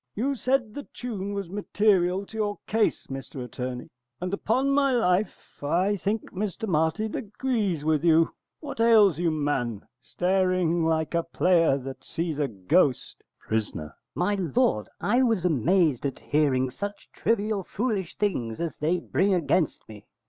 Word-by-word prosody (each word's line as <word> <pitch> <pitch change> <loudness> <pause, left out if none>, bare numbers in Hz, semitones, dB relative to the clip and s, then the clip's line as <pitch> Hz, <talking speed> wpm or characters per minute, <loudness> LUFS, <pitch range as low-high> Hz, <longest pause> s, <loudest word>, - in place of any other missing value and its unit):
] - - -54
You 265 +7 0
said 255 -3 0
the 285 - -7
tune 205 -5 -4
was 200 -2 -3
material 195 -2 +1
to 220 - -13
your 210 -2 -1
case, 220 0 +1
Mr 135 -1 -7
Attorney, 125 +1 -6 0.3
and 180 +1 -4
upon 255 +7 +1
my 275 -1 +3
life 205 -4 0
I 180 +8 +1
think 205 +3 -2
Mr 205 +2 -3
Martin 170 +6 0
agrees 210 - -2
with 155 -1 +2
you. 165 -1 +4 0.3
What 285 -6 -7
ails 215 -8 +5
you, 175 -1 +2
man? 145 -8 -1
staring 180 +2 +1
like 160 0 0
a 170 - +2
player 165 -3 +2
that 135 0 -8
sees 165 -3 -3
a 145 - +1
ghost! 120 - 0 0.2
Pris. 110 -1 -2 0.4
My 180 +4 +1
lord, 155 - +1
I 240 +5 +2
was 225 -8 +1
amazed 160 - +2
at 135 - -6
hearing 130 -4 +1
such 205 +8 -6
trivial, 215 -2 0
foolish 205 -4 -3
things 120 - -1
as 170 -1 -3
they 160 +4 +1
bring 190 +3 +1
against 165 0 0
me. 105 -2 -12
180 Hz, 155 wpm, -26 LUFS, 150-210 Hz, 0.4 s, ails